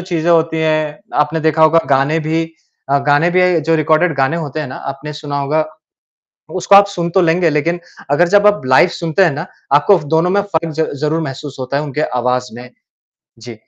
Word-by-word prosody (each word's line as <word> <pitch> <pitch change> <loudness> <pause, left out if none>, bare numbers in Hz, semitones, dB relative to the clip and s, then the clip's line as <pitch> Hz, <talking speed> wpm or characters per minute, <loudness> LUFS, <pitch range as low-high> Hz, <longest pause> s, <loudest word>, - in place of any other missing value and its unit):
चीज़ें 175 -2 -2
होती 160 -1 +2
हैं, 155 -1 -1 0.2
आपने 150 +2 0
देखा 160 0 +1
होगा 160 +1 +5
गाने 140 +4 +2
भी 160 +1 -1 0.5
अ, 140 - +3
गाने 145 +4 +3
भी 180 -2 +2
जो 165 +2 0
रिकॉर्डेड 160 +2 +1
गाने 135 +5 +1
होते 155 -2 -5
हैं 150 - -4
ना, 130 - -8
आपने 140 +2 -7
सुना 145 -1 -5
होगा। 150 +3 0 0.9
उसको 185 +2 +2
आप 200 0 +8
सुन 175 -4 -4
तो 190 +2 +2
लेंगे 165 0 +2
लेक़िन 165 +4 -1 0.3
अगर 170 +5 +3
जब 205 +2 +4
आप 205 0 +3
लाइव 130 +7 +5
सुनते 170 +3 0
हैं 175 - +3
ना, 150 +5 -5 0.3
आपको 150 +7 +4
फ 150 - -10
दोनों 165 +3 +2
में 200 +2 +2
फ़र्क 165 -5 -3
ज़ 160 - 0 0.2
ज़रूर 155 +2 -1
महसूस 140 0 -7
होता 130 +2 -3
है 145 - -1
उनके 150 0 -5 0.2
आवाज़ 125 +1 -1
में। 125 +1 -10 0.7
जी, 115 +1 -10
160 Hz, 205 wpm, -15 LUFS, 145-170 Hz, 0.9 s, आप